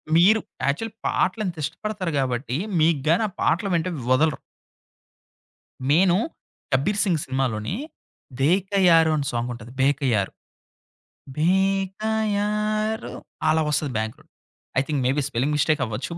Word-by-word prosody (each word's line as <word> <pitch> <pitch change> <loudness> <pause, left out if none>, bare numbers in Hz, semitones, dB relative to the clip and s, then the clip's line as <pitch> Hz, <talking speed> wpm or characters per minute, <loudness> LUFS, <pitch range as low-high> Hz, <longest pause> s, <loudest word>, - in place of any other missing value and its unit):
మీరు 195 +6 +6 0.3
యాక్చువల్లీ 210 +11 -1
పాటలంత 185 -2 0
ఇష్టపడతారు 185 +3 -3
గాబట్టి, 130 -1 -1 0.2
మీకు 155 -2 +3
గాని 170 +7 +4
ఆ 195 - -9
పాటలు 185 +5 +1
వింటే 170 +2 0 0.2
వదలరు. 150 +3 +3 1.5
నేను 175 +3 +5 0.6
'కబీర్ 200 +11 +1
సింగ్' 175 -7 +1
సినిమాలోని, 130 - -2 0.6
'బేకయారు' 175 0 +4
అని 145 -2 -1
సాంగ్ 120 +1 -2
ఉంటది. 120 0 -10
'బేకయారు'. 130 -7 +1 1.0
బేకయారు 210 +4 0 0.4
అలా 160 +1 +3
వస్తది. 150 -1 0
Back 110 0 -2
round. 155 +1 -24 0.5
I - - +4
think, 150 -3 -1
may 130 - +3
be 145 - +1
spelling 130 +6 0
mistake 150 0 +2
అవ్వచ్చు. 115 +7 -5
160 Hz, 120 wpm, -24 LUFS, 135-195 Hz, 1.5 s, మీరు